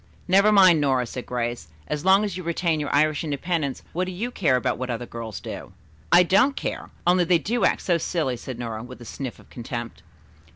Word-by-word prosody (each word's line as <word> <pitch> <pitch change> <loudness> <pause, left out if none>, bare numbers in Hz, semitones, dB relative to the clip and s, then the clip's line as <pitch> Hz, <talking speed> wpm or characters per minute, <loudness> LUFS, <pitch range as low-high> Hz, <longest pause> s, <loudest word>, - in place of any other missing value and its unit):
"Never 195 +3 +5
mind, 185 -6 +6
Nora," 130 -3 +2
said 125 +2 -7
Grace. 120 -7 -3 0.2
"As 150 0 -3
long 190 +2 +5
as 205 -4 -3
you 185 - -5
retain 170 -1 0
your 145 - -3
Irish 155 +1 +2
independence 150 -1 -2
what 180 +2 0
do 185 - -5
you 220 +7 -4
care 150 - +2
about 125 - -1
what 130 0 -4
other 120 0 -3
girls 115 -4 -7
do?" - - -8 0.4
"I 175 +1 +8
don't 225 +10 +3
care. - - -4 0.2
Only 180 +1 +4
they 175 0 +4
do 235 +8 0
act - - +2
so 170 -2 +2
silly," 155 -6 -1
said 120 +1 -7
Nora, 115 -2 -5
with 125 +2 -10
a 120 - -11
sniff 130 +1 -6
of - - -20
contempt. 120 - -6
150 Hz, 215 wpm, -24 LUFS, 125-180 Hz, 0.4 s, I